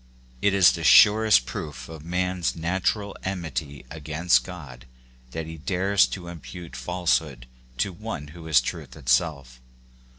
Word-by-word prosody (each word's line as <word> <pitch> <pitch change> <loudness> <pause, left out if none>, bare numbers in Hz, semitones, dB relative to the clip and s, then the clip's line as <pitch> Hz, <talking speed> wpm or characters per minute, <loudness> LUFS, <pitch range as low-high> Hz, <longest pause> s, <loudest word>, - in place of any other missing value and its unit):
It 100 -1 +2
is 95 -3 +7
the 85 - -5
surest 105 -2 +6
proof 65 -4 -7
of 80 -2 -10
a - - -15
man's 90 0 -1
natural 95 +4 -1
enmity 80 -7 -5
against 80 +2 +1
God 70 -11 -10 0.4
that 80 +4 -5
he 80 0 -8
dares 95 +4 +2
to 95 - -7
imoute 85 -2 -9
falsehood 75 -2 -1 0.3
to 95 +9 -1
one 85 -7 -7
who 80 +1 -11
is 75 -5 +5
truth - - -6
itself. 65 -2 -1
80 Hz, 140 wpm, -25 LUFS, 70-90 Hz, 0.4 s, is